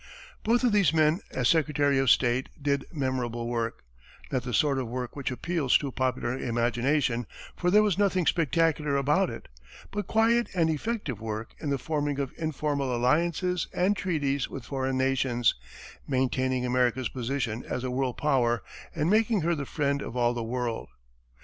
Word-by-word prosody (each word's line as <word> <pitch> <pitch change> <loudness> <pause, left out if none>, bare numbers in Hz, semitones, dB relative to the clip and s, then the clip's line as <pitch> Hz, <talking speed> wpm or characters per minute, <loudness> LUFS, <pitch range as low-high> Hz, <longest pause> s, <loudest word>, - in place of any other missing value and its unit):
Both 235 +3 +2
of 245 - +4
these 200 -8 +4
men, 155 +2 +3
as 125 -2 0
secretary 145 -3 +2
of 135 -2 +2
state, 125 +2 +3
did 140 -1 0
memorable 125 -5 -2
work; 115 -1 -3 0.5
not 130 - 0
the 125 0 -5
sort 140 +4 +2
of 130 - -3
work 125 +1 -5
which 140 -2 -3
appeals 140 +2 +1
to 140 -2 -4
popular 130 -1 -1
imagination, 120 +1 0 0.3
for 180 - 0
there 210 +3 +6
was 205 -3 +1
nothing 185 -3 +2
spectacular 160 -2 +2
about 150 +7 +2
it; - - -8 0.4
but 205 0 -3
quiet 230 +2 +3
and 165 -2 +3
effective 155 - -3
work 110 0 -5
in 150 - -3
the 140 - +1
forming 145 -1 -2
of 140 -2 -3
informal 145 -4 -1
alliances 170 +8 +1
and 185 +3 +2
treaties 145 -8 -1
with 130 -4 -7
foreign 130 -1 -2
nations, 130 -2 +2 0.5
maintaining 130 -1 0
America's 125 0 +1
position 125 -2 -3
as 125 - -4
a 130 - -2
world 130 -1 -1
power, 125 -5 +1 0.3
and 155 -1 0
making 215 +1 +3
her 170 +2 +1
the 145 -4 -4
friend 140 -2 0
of 125 - -6
all 120 0 +2
the 120 - -3
world. 120 0 -3
135 Hz, 170 wpm, -28 LUFS, 125-160 Hz, 0.5 s, there